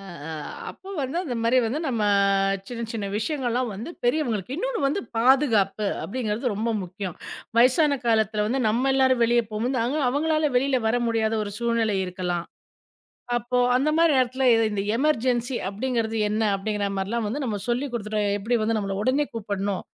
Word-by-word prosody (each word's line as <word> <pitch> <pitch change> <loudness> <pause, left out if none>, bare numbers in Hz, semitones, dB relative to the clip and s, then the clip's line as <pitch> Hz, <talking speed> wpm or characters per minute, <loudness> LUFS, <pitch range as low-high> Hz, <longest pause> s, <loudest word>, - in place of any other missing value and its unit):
அ - - -12 0.3
அ - - -4 0.4
அப்ப 390 0 -11
வந்து 275 +6 -2
இந்த 245 -4 -3
மாரி 240 +3 +4
வந்து 260 +8 -2
நம்ம 235 -6 -1 0.7
சின்ன, 235 -1 -5
சின்ன 210 -3 -3
விஷயங்கள்லாம் 245 0 -1
வந்து 220 - -6
பெரியவங்களுக்கு 245 - 0
இன்னொன்னு - - -2
வந்து 290 +8 0 0.2
பாதுகாப்பு 225 -5 +3 0.2
அப்பிடிங்கறது 230 +1 -2
ரொம்ப 220 +3 -1
முக்கியம். 185 0 -6 0.4
வயசான 275 +4 +4
காலத்துல 220 -2 +2
வந்து 265 +4 0
நம்ம 245 +5 +1
எல்லாரும் 260 -2 +3
வெளிய 240 +1 +3
போகும் 215 +3 -1
போது, - - +1 0.3
அவங்களால 310 +2 +1
வெளில 265 0 +1
வர 230 - +2
முடியாத 225 -1 +1
ஒரு 205 - -6
சூழ்நிலை 230 -3 +1
இருக்கலாம். 180 -2 -3 0.9
அப்போ 240 +1 -2 0.2
அந்த 275 +4 +2
மாரி 330 -1 +4
நேரத்துல 255 +1 +1 0.2
இந்த 205 -1 -2 0.2
எமெர்ஜென்ஸி 255 -3 +1
அப்பிடிங்கறது 225 +1 -2
என்ன? 215 +1 0 0.2
அப்பிடிங்கற 205 0 -2
மாரிலாம் 215 +4 -1
வந்து 275 +6 -3
நம்ம 210 -3 -2
சொல்லி 250 +4 0
குடுத்துட்டோம், 210 -2 -1
எப்படி 230 +4 0
வந்து 225 +1 +1
நம்மள 195 -2 -2
உடனே 270 +6 +2
கூப்பிடணும், 200 -3 -2
235 Hz, 160 wpm, -25 LUFS, 210-260 Hz, 0.9 s, மாரி